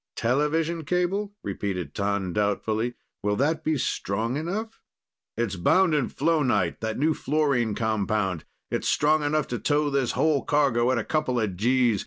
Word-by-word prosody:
"Television 155 Hz, +6 st, 0 dB
cable?" 185 Hz, +5 st, -1 dB
repeated 95 Hz, -6 st, -3 dB
T'an 100 Hz, -3 st, -1 dB
doubtfully. 110 Hz, +3 st, 0 dB, 0.3 s
"Will 105 Hz, 0 st, 0 dB
that 150 Hz, +7 st, 0 dB
be 155 Hz, -1 st, +1 dB
strong 115 Hz, -1 st, -1 dB
enough?" 200 Hz, +9 st, -4 dB, 0.6 s
"It's 115 Hz, -4 st, -1 dB
bound 180 Hz, -, +3 dB
in 145 Hz, -4 st, +1 dB
flonite, 130 Hz, -, +1 dB
that 110 Hz, -1 st, -3 dB
new 155 Hz, +3 st, +2 dB
fluorine 140 Hz, -8 st, 0 dB
compound. 105 Hz, -6 st, -1 dB, 0.3 s
It's -, -, -1 dB
strong 155 Hz, +1 st, +3 dB
enough 150 Hz, 0 st, 0 dB
to 120 Hz, -, -2 dB
tow 145 Hz, 0 st, +1 dB
this 135 Hz, -3 st, 0 dB
whole 155 Hz, -3 st, +2 dB
cargo 135 Hz, -5 st, +2 dB
at 130 Hz, -, +2 dB
a 115 Hz, -, 0 dB
couple 150 Hz, -4 st, 0 dB
of 105 Hz, -5 st, -1 dB
Gs. 120 Hz, +1 st, +2 dB
130 Hz, 155 wpm, -26 LUFS, 105-155 Hz, 0.6 s, bound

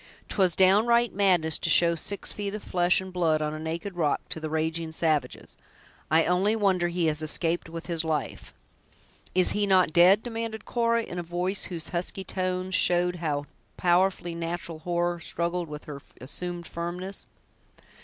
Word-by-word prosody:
'Twas 185 Hz, -4 st, +2 dB
downright 225 Hz, +5 st, +4 dB
madness 180 Hz, -6 st, +3 dB
to -, -, -1 dB
show 170 Hz, -1 st, +5 dB
six 200 Hz, +4 st, -3 dB
feet 205 Hz, 0 st, -4 dB
of 210 Hz, -, -7 dB
flesh 175 Hz, 0 st, +2 dB
and 190 Hz, -1 st, -9 dB
blood, 165 Hz, -4 st, +2 dB
on 150 Hz, 0 st, -2 dB
a 155 Hz, -, -6 dB
naked 165 Hz, +4 st, -5 dB
rock, 155 Hz, -4 st, +1 dB
to -, -, -4 dB
the 155 Hz, 0 st, -5 dB
raging 160 Hz, +1 st, -2 dB
savages. 160 Hz, -2 st, -1 dB, 0.5 s
I 160 Hz, +1 st, +4 dB
only 190 Hz, +5 st, +2 dB
wonder 190 Hz, -5 st, +2 dB
he 175 Hz, 0 st, -1 dB
has 155 Hz, -1 st, +1 dB
escaped 165 Hz, +2 st, 0 dB
with 165 Hz, 0 st, -7 dB, 0.2 s
life." 155 Hz, -3 st, -3 dB, 0.8 s
"Is 185 Hz, -1 st, +5 dB
he 205 Hz, -1 st, 0 dB
not 185 Hz, -4 st, +3 dB
dead?" 185 Hz, +5 st, +6 dB
demanded 225 Hz, -2 st, -5 dB
Cora, 230 Hz, -1 st, +1 dB
in 180 Hz, -4 st, -6 dB
a -, -, -1 dB
voice 175 Hz, +3 st, -1 dB
whose 170 Hz, -4 st, -5 dB
husky 180 Hz, +2 st, -3 dB
tones 185 Hz, 0 st, -3 dB
showed 180 Hz, 0 st, +3 dB
how 150 Hz, -4 st, -2 dB, 0.3 s
powerfully 180 Hz, 0 st, +2 dB
natural 170 Hz, -1 st, -4 dB
horror 175 Hz, +1 st, -1 dB
struggled 170 Hz, +1 st, -2 dB
with 150 Hz, 0 st, -7 dB
her 140 Hz, -2 st, -8 dB, 0.2 s
assumed 175 Hz, +6 st, -5 dB
firmness. 175 Hz, +4 st, -5 dB
175 Hz, 165 wpm, -27 LUFS, 165-190 Hz, 0.8 s, dead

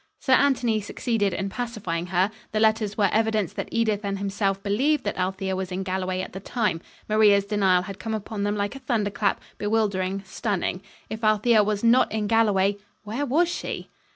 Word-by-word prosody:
Sir 265 Hz, -, +2 dB
Anthony 250 Hz, -6 st, +3 dB
succeeded 205 Hz, -1 st, -1 dB
in 195 Hz, +2 st, -2 dB
pacifying 195 Hz, -7 st, -4 dB
her. 185 Hz, +3 st, +1 dB, 0.2 s
The 215 Hz, -, +1 dB
letters 220 Hz, -1 st, +2 dB
were 200 Hz, -3 st, +3 dB
evidence 215 Hz, -4 st, +1 dB
that -, -, -5 dB
Edith 220 Hz, -2 st, 0 dB
and 200 Hz, -1 st, -2 dB
himself 195 Hz, 0 st, -1 dB
believed 265 Hz, +8 st, +1 dB
that -, -, -2 dB
Althea 190 Hz, +1 st, -2 dB
was 190 Hz, 0 st, -4 dB
in 185 Hz, +1 st, -2 dB
Galloway 185 Hz, 0 st, -2 dB
at -, -, -8 dB
the 190 Hz, -, -5 dB
time. 205 Hz, -5 st, -1 dB, 0.3 s
Maria's 210 Hz, -2 st, +4 dB
denial 195 Hz, -3 st, +2 dB
had 195 Hz, 0 st, -8 dB
come 220 Hz, +3 st, -3 dB
upon 215 Hz, 0 st, -5 dB
them 205 Hz, +1 st, 0 dB
like 205 Hz, +4 st, -2 dB
a -, -, -7 dB
thunderclap, 210 Hz, -5 st, 0 dB, 0.2 s
bewildering, 200 Hz, -3 st, 0 dB
stunning. 190 Hz, -2 st, -2 dB, 0.3 s
If 220 Hz, +1 st, -5 dB
Althea 215 Hz, +1 st, +4 dB
was 210 Hz, 0 st, -1 dB
not 235 Hz, +2 st, +4 dB
in 215 Hz, -1 st, -1 dB
Galloway, 205 Hz, -3 st, +2 dB, 0.3 s
where 235 Hz, +7 st, -3 dB
was 320 Hz, +7 st, +3 dB
she? 345 Hz, -, -5 dB
205 Hz, 180 wpm, -25 LUFS, 195-225 Hz, 0.3 s, Maria's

